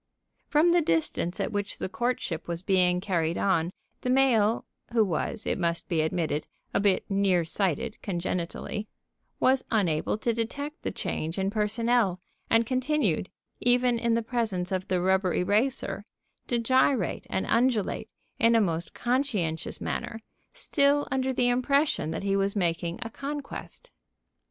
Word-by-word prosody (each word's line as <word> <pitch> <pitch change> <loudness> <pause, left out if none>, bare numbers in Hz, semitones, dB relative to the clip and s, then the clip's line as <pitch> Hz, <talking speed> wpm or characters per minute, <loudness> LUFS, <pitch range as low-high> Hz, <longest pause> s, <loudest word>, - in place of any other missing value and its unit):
From 315 +4 +4
the 345 0 +4
distance 170 - 0
at - - -1
which 205 -1 -3
the - - -3
courtship 225 -6 -2
was 170 +1 -4
being 180 -2 +3
carried 170 -4 0
on, 170 -4 +2 0.3
the 250 - -2
male 240 -4 +3 0.3
(who 225 -2 +4
was, 190 +3 -2
it - - -1
must 170 -1 -1
be 165 -4 +1
admitted, 160 -1 -1 0.3
a - - +2
bit 200 -2 +2
near 195 -4 +2
sighted 185 +2 -1
congenitally) 180 +3 -3 0.5
was 260 0 +3
unable 185 -6 +1
to 230 +2 0
detect 285 - -4
the - - -2
change 160 +3 -3
in 195 0 0
personnel, 215 -2 +1 0.3
and 230 0 +4
continued, 260 +5 +1 0.3
even 245 -1 +3
in 235 0 +2
the 230 - 0
presence 220 -7 -1
of 185 -1 -2
the 185 - +1
rubber 190 0 +2
eraser, 215 +8 0 0.4
to 240 - +1
gyrate 255 - +2
and 190 - -1
undulate 230 -2 +1 0.3
in 230 0 +5
a - - +6
most 170 -5 -1
conscientious 230 - -1
manner, 225 - -3 0.3
still 290 -11 +2
under 265 0 +1
the 250 -1 +2
impression 265 - +2
that 160 - -4
he 195 0 +1
was 195 +1 +1
making 170 -2 0
a 230 - -5
conquest. 290 - -7
210 Hz, 150 wpm, -27 LUFS, 180-250 Hz, 0.5 s, a